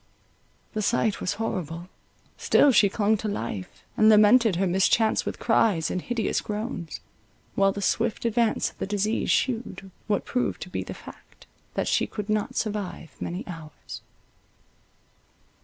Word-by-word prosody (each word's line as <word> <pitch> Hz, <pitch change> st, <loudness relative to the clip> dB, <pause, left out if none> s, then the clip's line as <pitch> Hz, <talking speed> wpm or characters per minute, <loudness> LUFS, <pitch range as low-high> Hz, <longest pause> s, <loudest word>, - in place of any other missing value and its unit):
The 215 Hz, -, -1 dB
sight 215 Hz, 0 st, +1 dB
was 180 Hz, -, -1 dB
horrible; 175 Hz, -6 st, -4 dB, 0.5 s
still 290 Hz, -, +4 dB
she 210 Hz, -4 st, +5 dB
clung 215 Hz, +2 st, +1 dB
to 215 Hz, -, -4 dB
life, 110 Hz, -, -5 dB
and 215 Hz, -, +5 dB
lamented 215 Hz, 0 st, +6 dB
her 190 Hz, +3 st, +1 dB
mischance 190 Hz, +4 st, +2 dB
with -, -, -3 dB
cries 210 Hz, -8 st, +2 dB
and 180 Hz, -, -2 dB
hideous 235 Hz, +1 st, -1 dB
groans; 210 Hz, -5 st, -5 dB, 0.5 s
while 195 Hz, 0 st, +3 dB
the 200 Hz, +1 st, -5 dB
swift 225 Hz, +2 st, 0 dB
advance 230 Hz, -1 st, +1 dB
of -, -, -29 dB
the -, -, -3 dB
disease 210 Hz, +2 st, -1 dB
shewed, 230 Hz, -6 st, -1 dB, 0.2 s
what 205 Hz, -2 st, 0 dB
proved 250 Hz, -, -1 dB
to -, -, -11 dB
be -, -, -2 dB
the -, -, -7 dB
fact, -, -, -14 dB, 0.3 s
that -, -, -1 dB
she -, -, +2 dB
could 210 Hz, -1 st, -6 dB
not 215 Hz, -1 st, -1 dB
survive 205 Hz, -7 st, -3 dB
many 180 Hz, +3 st, -4 dB
hours. 165 Hz, -4 st, -9 dB
210 Hz, 150 wpm, -26 LUFS, 185-225 Hz, 0.5 s, lamented